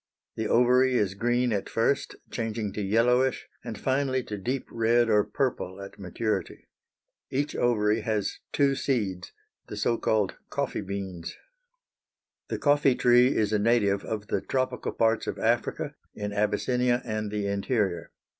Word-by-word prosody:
The 110 - -2
ovary 125 +2 +4
is 100 -5 +1
green 120 +3 +1
at 100 - -2
first, 125 +5 0 0.2
changing 110 -3 -3
to 105 - -3
yellowish, 125 +6 +2 0.2
and 115 -3 -6
finally 130 +1 0
to 105 - -5
deep 125 +6 -2
red 115 0 +2
or 105 -1 +5
purple 105 -4 -2
at 100 +1 -10
maturity. 105 +4 -3 0.6
Each 145 +3 -1
ovary 110 -2 +2
has 105 -2 -2
two 140 -1 +3
seeds, 105 -10 -2 0.4
the - - -7
so 115 -1 +1
called 105 -3 +1
coffee - - -2
beans. 95 -3 -6 1.1
The - - -3
coffee 145 -3 +3
tree 125 +2 +5
is 110 -1 +1
a 105 - +3
native 100 -3 +2
of 105 -2 -4
the 100 - -1
tropical 130 +2 -2
parts 115 0 +1
of - - -3
Africa, - - 0 0.2
in 105 0 -4
Abyssinia 120 +4 +1
and 110 -2 -2
the 105 -1 -2
interior. 100 -4 -1
110 Hz, 145 wpm, -27 LUFS, 105-125 Hz, 1.1 s, or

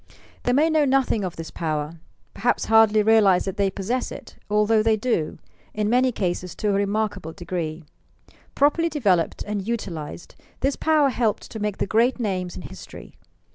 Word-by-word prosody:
They 245 - +2
may 295 +5 +4
know 315 -2 +3
nothing 265 -6 +2
of 180 -3 -4
this 165 0 -7
power, 155 0 -3
— - - -41
perhaps 240 +4 0
hardly 220 -1 +5
realize 210 -4 +4
that 195 +2 -4
they 200 -1 +2
possess 215 +7 -3
it, - - -10
although 210 +1 +3
they 220 0 +2
do, 210 -9 -1 0.2
— - - -33
in 210 0 0
many 255 +1 +3
cases, 180 -4 -3
to 210 - -1
a - - +2
remarkable 200 -4 -1
degree. 170 -3 -5 0.7
Properly 315 +4 +3
developed 195 - +1
and 205 -1 -4
utilized, 175 -9 -5 0.3
this 275 +1 +1
power 310 -3 +3
helped 230 -4 -1
to 220 - -6
make 210 -1 -2
the - - -1
great 235 +6 +2
names 185 -5 -2
in - - -8
history. 85 -2 -11
210 Hz, 175 wpm, -23 LUFS, 180-240 Hz, 0.7 s, hardly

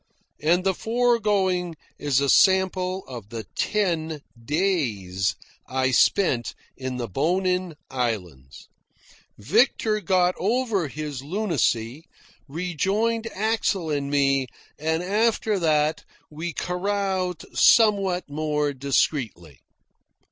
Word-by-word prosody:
And 170 +4 +2
the 190 0 +2
foregoing 205 -6 +1 0.2
is 145 -3 +1
a 140 - 0
sample 190 +2 +3
of 120 -6 -9
the 115 0 -6
ten 165 -7 -1 0.2
days 115 - 0 0.3
I 130 0 0
spent 130 - +2 0.2
in 130 -1 -5
the 120 -2 -3
Bonin 180 - 0 0.2
Islands. 90 - -4 0.7
Victor 215 - +2
got 180 0 +2
over 215 - 0
his 145 -2 -6
lunacy, 150 - -1 0.4
rejoined 195 +9 -1
Axel 205 -6 -1
and 140 -1 -1
me, 135 -2 +2 0.3
and 160 +2 -1
after 210 +1 +1
that 155 -2 +1 0.3
we 160 +3 -4
caroused 185 -1 -2
somewhat 200 -5 +4
more 150 0 -1
discreetly. 130 - -1
165 Hz, 95 wpm, -24 LUFS, 135-195 Hz, 0.7 s, somewhat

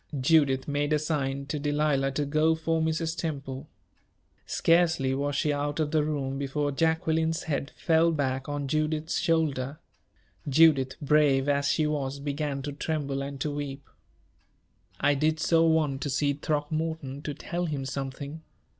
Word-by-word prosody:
Judith 135 -1 +3
made 145 +1 -1
a - - +4
sign 140 -3 -2
to 150 +1 -3
Delilah 145 -1 +1
to 145 +1 -1
go 155 +3 +2
for 160 0 0
Mrs. 160 +1 -1
Temple. 140 -3 -5 0.8
Scarcely 165 -6 +2
was 140 +1 -1
she 150 0 +1
out 145 +1 -2
of 150 -1 0
the 155 -2 +2
room, 140 -3 -2
before 145 +1 -1
Jacqueline's 160 +1 +1
head 140 -3 -2
fell 165 0 +3
back 135 -3 -1
on 145 -1 -3
Judith's 155 +2 0
shoulder. 150 -4 0 0.7
Judith, 140 -3 +4
brave 145 -2 +3
as 140 0 +2
she 155 - +2
was, 140 -2 -2
began 140 -1 -3
to 145 - -4
tremble 140 -2 -2
and 140 0 -6
to 150 - -1
weep. 145 -1 -5 1.1
"I 145 - +3
did 155 +2 +1
so 165 +1 +3
want 150 -4 +1
to 145 - -2
see 145 +1 +1
Throckmorton, 150 -1 -3
to 145 -1 -5
tell 175 +4 -3
him 145 -5 -3
something. 140 +3 -5
145 Hz, 155 wpm, -27 LUFS, 140-160 Hz, 1.1 s, a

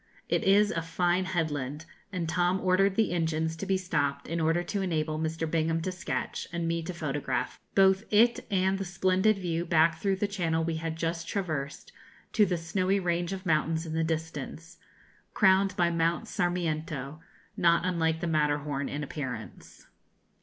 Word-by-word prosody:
It - - +1
is 205 +2 +5
a 165 - -1
fine 175 +3 +1
headland, 155 -5 -2 0.3
and 180 -4 -2
Tom 175 +2 +1
ordered 190 +1 +3
the 220 -3 +2
engines 160 -1 0
to 195 - -5
be 195 -1 +2
stopped 145 -6 -1
in 170 +2 -2
order 165 +2 +2
to 200 +3 -2
enable 155 -4 -1
Mr. 160 +1 -2
Bingham 165 0 +1
to 185 - -1
sketch, 185 +2 -4
and 170 -1 -2
me 165 0 0
to 165 - -5
photograph, 150 -5 -3 0.2
both 190 0 +5
it 235 +3 +4
and 190 -1 +1
the - - -1
splendid 190 +3 +2
view 170 -3 -2
back 165 -1 +3
through 195 -1 +2
the 195 - -1
channel 165 -5 0
we 165 0 -1
had 160 0 -3
just 165 0 -3
traversed 155 -9 -3 0.4
to 210 -3 +4
the 180 -1 0
snowy 185 +4 0
range 175 -1 -1
of 190 0 -5
mountains 160 0 +1
in 160 - -5
the 165 0 +1
distance, 160 +1 -4 0.6
crowned 190 -1 +4
by 170 -1 +3
Mount 165 0 0
Sarmiento, 155 -5 -2 0.4
not 170 +1 +3
unlike 160 -3 0
the - - -1
Matterhorn 145 -2 0
in 145 +1 -4
appearance. 130 -6 -7
170 Hz, 170 wpm, -29 LUFS, 160-185 Hz, 0.6 s, is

